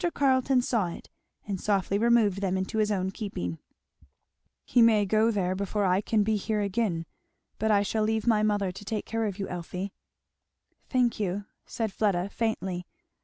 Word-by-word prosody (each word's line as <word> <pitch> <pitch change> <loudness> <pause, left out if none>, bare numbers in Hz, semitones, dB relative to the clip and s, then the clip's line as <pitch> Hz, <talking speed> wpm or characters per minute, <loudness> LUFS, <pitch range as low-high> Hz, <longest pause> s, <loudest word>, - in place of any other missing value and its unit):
Carleton 260 -2 +3
saw 225 -7 +1
it 170 - -9 0.4
and 195 -3 -3
softly 200 -1 +1
removed 225 -4 +3
them 190 -1 0
into 190 +4 -2
his 215 0 +2
own 190 -2 0
keeping. 140 - -4 1.1
"He 245 - +3
may 220 -3 +5
go 215 +3 +3 0.2
before 200 +2 -1
I 185 +1 +3
can 215 0 +1
be 215 +1 +1
here 215 +1 -1
again. 200 -5 -1 0.5
But 220 - +1
I 205 -1 +4
shall 215 +2 -1
leave 220 0 0
my 220 -3 +3
mother 205 -3 +1
to 190 - -10
take 210 +1 -3
care 225 0 -1
of 200 -3 -3
you, 195 - -3
Elfie." 180 +2 -5 1.0
"Thank 250 -4 +1
you," 200 0 -2 0.2
said 220 -4 -3
Fleda 195 -3 +1
faintly. 190 -6 -2
205 Hz, 170 wpm, -28 LUFS, 190-220 Hz, 1.1 s, may